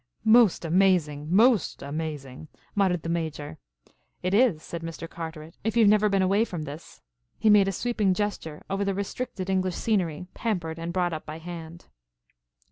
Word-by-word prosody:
"Most 220 -5 +5
amazing! 165 -4 +2
Most 215 - +3
amazing!" 145 -1 -5 0.3
muttered 185 -5 +1
the - - -5
Major. 160 - -3 0.6
"It 185 +1 0
is," 205 -8 +3
said 170 - -6
Mr. 165 0 -6
Carteret, 160 -1 -8
"if 220 +2 -1
you 230 - +6
have 205 - +6
never 210 0 +4
been 195 -1 +2
away 200 +4 +3
from 175 -8 -5
this." 150 +2 -10 0.3
He 215 - +4
made 205 -2 +6
a - - +1
sweeping 210 -2 0
gesture 200 -7 -3
over 195 +1 -1
the 195 -1 -1
restricted 200 -1 -4
English 185 -2 0
scenery, 180 -7 -1
pampered 175 -8 -3
and 165 +1 -4
brought 175 -1 0
up 155 - -6
by 155 +1 -6
hand. 170 0 -9
180 Hz, 170 wpm, -26 LUFS, 160-200 Hz, 0.6 s, you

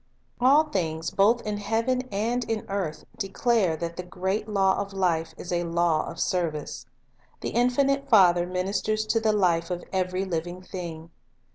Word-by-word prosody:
Unity - - -42
of - - -26
Law 280 +3 +7
All 310 - +5
things 160 -3 -2
both 220 +5 +3
in 210 -1 -2
heaven 225 +5 0
and 230 +5 0
in 225 -2 -2
earth 185 -6 -3
declare 195 -3 +1
that 170 +1 -5
the - - -2
great 190 +4 -2
law 195 -2 +2
of 200 -1 -4
life 165 -4 0
is 180 - -7
a 175 0 +1
law 170 -2 +1
of - - -7
service. 165 -5 -2 0.5
The - - -2
infinite 275 +3 +1
Father 175 -6 +5
ministers 200 +4 -1
to 225 +1 +1
the 220 -1 +2
life 175 -5 +2
of 175 -1 -3
every 185 0 0
living 175 0 -4
thing. 170 -3 -7
190 Hz, 175 wpm, -26 LUFS, 175-215 Hz, 0.5 s, Law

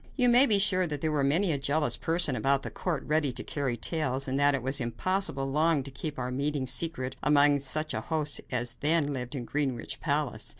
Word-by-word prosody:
You 250 -3 +3
may 250 +3 +7
be 210 - +5
sure 185 -2 +2
there 155 0 -3
was 145 -2 0
many 170 +6 +1
a 145 - -2
jealous 145 +2 0
person 165 -4 +2
about 135 +1 0
the - - -7
court 165 -7 -4
ready 150 -2 0
to - - 0
carry 135 -5 -3
tales, 135 0 -1
and 135 +1 -2
that 145 0 +3
it 130 - -5
was 135 +2 +2
impossible 140 - -2
long 150 +1 +1
to 135 - -8
keep 150 +2 -7
our 125 0 -4
meetings 140 -1 -1
secret 130 -6 0
among 145 -1 +3
such 155 +3 +1
a - - -3
host 155 -3 -1
as 120 -1 +3
then 145 +1 0
lived 125 0 -6
in 125 -3 -5
Greenwich 135 -5 -3
palace. - - -2
145 Hz, 215 wpm, -27 LUFS, 135-160 Hz, -, may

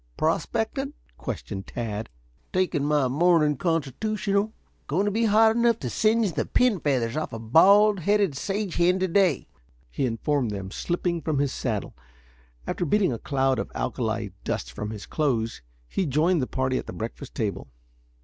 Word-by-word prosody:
"Prospecting?" 225 - -1 0.2
questioned 95 -2 -6
Tad. 110 -3 -4 0.4
"Taking 185 -6 +1
my 145 -2 +2
morning 150 +2 +3
constitutional. 200 - -1 0.4
Going 180 +8 +1
to 205 - +1
be 225 +3 +1
hot 220 +1 +5
enough 235 -1 +3
to - - -3
singe 220 -2 +2
the - - -1
pin 250 -6 +2
feathers 130 -6 0
off 155 - -2
a - - -3
bald 195 - +5
headed 200 -3 +2
sage 195 +4 -3
hen 175 +2 +4
to 190 0 0
day," 180 -5 +2 0.4
he 135 - 0
informed 125 +2 0
them, 100 -2 -5
slipping 175 - -2
from 155 -1 -1
his 140 -1 +1
saddle. 110 -6 -3 0.7
After - - -2
beating 185 -2 +2
a 115 - -5
cloud 135 -2 +1
of - - -4
alkali 110 -3 -2
dust - - -3
from 105 +12 -5
his 105 -2 -7
clothes 120 - -1 0.3
he 185 - -1
joined 155 +4 +2
the 125 - -1
party 130 0 0
at - - -8
the - - -6
breakfast 120 +4 -7
table. 105 - -2
155 Hz, 165 wpm, -25 LUFS, 125-200 Hz, 0.7 s, hot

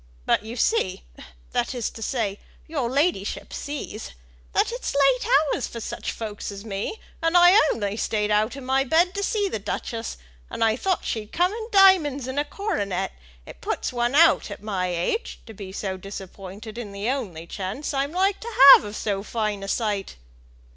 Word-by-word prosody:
But, - - +3
you 225 +2 -7
see 245 - 0 0.5
that - - -1
is 240 -3 -2
to 225 - -11
say, 215 -4 -2 0.3
your 280 -7 -2
ladyship 275 - -1
sees, 285 -6 -6 0.4
that - - +2
it's 485 - -4
late 275 -3 +3 0.3
hours 265 - -2
for 235 - -7
such - - -4
folks 210 -2 -6
as 200 +1 -9
me, 210 - -4 0.2
and 330 +2 +3
I 350 0 +8 0.2
only 205 -2 -2
stayed 210 -2 0
out 215 +4 +2
of 275 - -8
my 265 +1 +2
bed 335 +7 +3
to 400 - -3
see 410 0 0
the 220 - -3
duchess, 225 +3 -4 0.3
and - - -2
I 220 -1 +3
thought 375 +8 -1
she'd 215 -2 -3
come 360 +3 +2
in 445 0 -5
diamonds 360 - +5
and 260 +2 -2
a 295 - 0
coronet; 205 - -2 0.3
and - - -10
it 60 - -28
puts - - -2
one 240 +2 0
out 330 -5 +5
at 205 - -8
my 190 -4 -1
age, 180 - -2
to 225 - -10
be 195 -2 -8
disappointed 195 +2 -7
in 210 -4 -7
the 200 +2 -4
only 200 -12 -3
chance 200 - -4
I'm 275 +1 0
like 385 +3 +1
to 470 - -6 0.2
have - - +7
of 210 0 -7
so 200 -3 -2
fine 215 -1 -2
a 195 - -6
sight." 205 -2 -1
230 Hz, 190 wpm, -24 LUFS, 205-295 Hz, 0.5 s, I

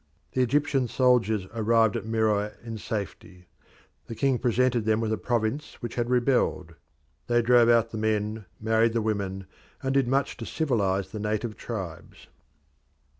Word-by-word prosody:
The 130 - 0
Egyptian 135 0 +1
soldiers 115 -5 +2
arrived 115 0 +2
at 110 -2 -4
Meroe 110 -2 +1
in 115 -2 -6
safety; 100 -3 -6 0.6
the 115 - -6
king 135 0 +1
presented 125 -1 +1
them 110 0 +2
with 110 -1 -1
a - - -1
province 120 +4 -2
which 120 -2 -6
had 120 -1 -2
rebelled. 120 -9 +1 0.5
They 120 0 +2
drove 120 0 +5
out 115 -1 +3
the 110 - -4
men, 110 0 -1
married 110 +1 +2
the 115 - +1
women, 100 -3 -2 0.4
and 135 0 0
did 135 -2 +2
much 135 +2 0
to 115 - -6
civilise 100 - 0
the 105 - -5
native 105 +1 -2
tribes. 95 -9 -7
115 Hz, 155 wpm, -26 LUFS, 105-120 Hz, 0.6 s, drove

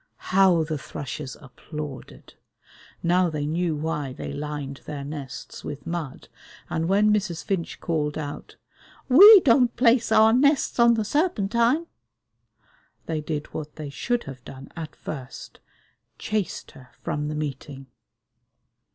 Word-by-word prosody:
How 185 -3 +5
the 155 -1 -3
thrushes 135 -1 -7
applauded! 150 +1 -9 0.7
Now 180 +1 +3
they 150 -2 -3
knew 165 +1 -1
why 150 -3 -3
they - - -6
lined 145 -1 -5
their 145 -2 -5
nests 140 -2 -8
with 145 - -7
mud, 165 -5 -5 0.4
and 165 +1 -1
when 210 +2 +4
Mrs. 195 -5 -1
Finch 185 -4 -3
called 150 -3 -2
out, 145 -2 -7 0.5
"We 395 - +10
don't 245 -3 +4
place 235 -1 +3
our 220 0 +6
nests 280 +1 +2
on 235 0 +6
the 220 -1 -1
Serpentine," 240 - +1 1.2
they 160 -2 -2
did 150 -1 -5
what 150 -1 -6
they 150 -2 -7
should 240 +10 -1
have 130 -2 -10
done 135 +1 -11
at 165 -2 -7
first: 135 -3 -8 0.6
chased 210 -3 -3
her 130 -1 -16
from 150 0 -2
the 150 - -3
meeting. 140 -2 -5
160 Hz, 135 wpm, -25 LUFS, 145-215 Hz, 1.2 s, We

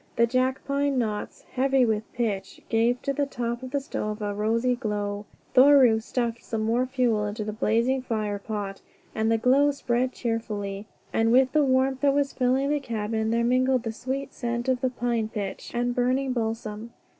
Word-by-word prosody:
The 235 - +4
jack 255 +2 0
pine 280 -1 0
knots, 215 -4 -3
heavy 265 0 +3
with 220 -1 -1
pitch, 200 -5 -3
gave 235 +2 +2
to 275 - 0
the 285 0 0
top 240 -2 -3
of 260 - -6
the 280 +2 0
stove 215 -5 -4
a 205 -1 -2
rosy 230 +4 +1
glow. 205 -3 -3 0.3
Thoreau 260 -4 +7
stuffed 235 +1 -3
more 225 +3 +1
fuel 245 -5 +1
into 210 +1 -4
the 215 0 -4
blazing 230 +5 +1
firepot, 210 -3 -3 0.3
and 220 +1 0
the 225 - +3
glow 265 +5 +4
spread 255 -2 0
cheerfully, 215 -4 -3 0.3
and 225 0 +2
with 255 +1 +5
the 305 -1 +3
warmth 265 0 +2
that 280 -1 +3
was 285 -1 +1
filling 265 +2 +1
the 295 - +1
cabin 220 -3 -2
there 235 +1 +1
mingled 255 +1 +2
the 225 - -2
sweet 265 +4 -4
scent 240 0 -3
of 255 -1 +1
the 260 - +2
pine 235 -3 -1
pitch 200 -3 -5
and 245 0 0
burning 255 +2 +1
balsam. 225 -1 -4
240 Hz, 180 wpm, -26 LUFS, 220-260 Hz, 0.3 s, Thoreau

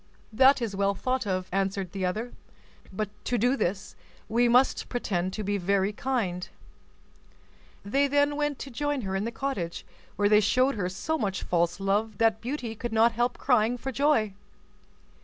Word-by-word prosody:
"That 260 +2 +5
is 210 -4 -3
well 200 0 +1
thought 255 +1 -1
of," 185 -1 -1
answered 195 -1 -1
the 190 -2 -2
other, 220 +7 -4 0.6
"but 205 +2 -3 0.2
to 245 - 0
do 245 +4 +2
this, 190 -4 -2 0.3
we 240 +2 +2
must 250 +3 +3
pretend 185 -7 -1
to 215 - -4
be 205 0 -1
very 195 +2 +1
kind." 205 -8 -2 1.4
They 275 +7 +2
then 285 +1 +2
went 295 -1 -1
to 275 - -10
join 290 +2 -1
her 190 -3 -3
in 195 +2 -1
the 230 - -3
cottage, 225 -10 -4 0.3
where 205 - +2
they 210 0 +6
showed 255 +6 +2
her 185 -6 -2
so 315 +12 -2
much 200 -4 -2
false 175 +1 0
love 205 +2 0
that 225 -1 +2
Beauty 245 -2 -4
could 240 +1 -5
not 225 +1 +5
help 240 +2 -1
crying 245 -2 +2
for 265 +2 -5
joy. 260 -7 +2
220 Hz, 175 wpm, -27 LUFS, 195-255 Hz, 1.4 s, they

